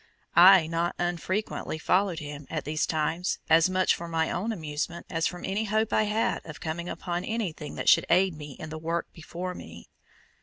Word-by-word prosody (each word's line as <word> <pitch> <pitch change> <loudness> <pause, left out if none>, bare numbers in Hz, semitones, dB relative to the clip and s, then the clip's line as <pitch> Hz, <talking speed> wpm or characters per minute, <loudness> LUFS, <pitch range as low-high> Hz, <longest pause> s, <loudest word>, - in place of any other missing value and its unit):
I 180 -1 +8
not 165 +2 -1
unfrequently 175 +1 -2
followed 185 +2 +1
him 145 -2 -7
at 155 -2 -3
these 155 +1 0
times 160 +3 -1
as 165 +2 +6
much 185 0 +3
for 170 - -5
my 165 -1 0
own 210 +6 -1
amusement 160 -2 -4
as 165 -2 +1
from 180 - -6
any 200 +3 -1
hope 220 +1 0
I 215 - +3
had 215 +2 0
of 160 -2 -9
coming 170 +2 -4
upon 175 0 -3
anything 185 -9 -4
that - - -5
should - - +6
aid 185 +2 +4
me 150 -2 -8
in 155 +3 -9
the 160 - -5
work 165 +1 -3
before 175 +2 -6
me. 85 - -11
170 Hz, 190 wpm, -27 LUFS, 160-185 Hz, -, I